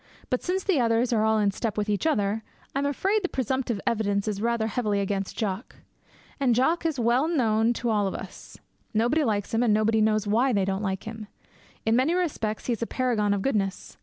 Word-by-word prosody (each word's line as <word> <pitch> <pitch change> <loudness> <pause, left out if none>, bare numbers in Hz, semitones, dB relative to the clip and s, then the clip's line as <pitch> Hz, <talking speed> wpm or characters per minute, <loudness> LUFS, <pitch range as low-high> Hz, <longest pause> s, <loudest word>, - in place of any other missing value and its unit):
But 255 - +1
since 370 +1 -1
the 380 -8 +2
others 235 +1 +2
are 215 -1 +2
all 220 0 +3
in 205 -2 +2
step 215 +1 -3
with 210 0 0
each 210 +8 0
other, 210 -6 +1 0.3
I 275 - 0
am 280 - 0
afraid 390 +9 +1
the 365 - 0
presumptive 260 -3 -1
evidence 205 -2 0
is 205 -2 -2
rather 235 -1 +1
heavily 215 -2 0
against 195 -1 -2
Jock. 200 0 -3 0.6
And 255 -4 +3
Jock 325 +7 +2
is 305 -5 -2
well 240 +5 +2
known 230 -8 +2
to 235 0 -1
all 205 -2 +2
of 190 - -3
us. - - -9 0.4
Nobody 245 +8 +2
likes 210 -5 -1
him, 225 - +2
and 225 -4 +3
nobody 220 +1 +2
knows 215 -1 +2
why 235 +5 +2
they 200 -2 +2
don't 195 +1 -1
like 190 -2 -2
him. 220 -1 -7 0.6
In 225 +1 +3
many 270 +8 +2
respects 270 -12 -2
he 245 - +1
is 230 - -6
a 230 - -1
paragon 235 -5 0
of 200 -1 0
goodness. 200 -8 -2
225 Hz, 220 wpm, -26 LUFS, 210-255 Hz, 0.6 s, all